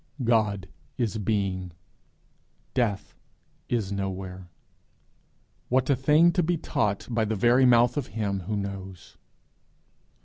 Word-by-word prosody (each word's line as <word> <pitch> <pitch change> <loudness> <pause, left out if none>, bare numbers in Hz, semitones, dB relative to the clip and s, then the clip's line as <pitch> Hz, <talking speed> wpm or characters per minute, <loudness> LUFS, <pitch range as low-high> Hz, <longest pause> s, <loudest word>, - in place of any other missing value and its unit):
God 105 -5 +1 0.3
is 115 -3 -1
being; 95 -4 -1 1.0
death 115 -6 -1 0.6
is 110 -5 -1
nowhere! 95 -2 -5 1.2
What 130 +2 +2
a - - +4
thing 150 +6 +4
to 180 - +1
be 170 +1 0
taught 105 -8 -1
by 115 -2 0
the 110 0 -1
very 120 +5 +4
mouth 120 +2 +4
of 140 - -2
him 100 -3 -1
who 105 -1 -1
knows! 95 -3 -7
110 Hz, 115 wpm, -26 LUFS, 95-125 Hz, 1.2 s, a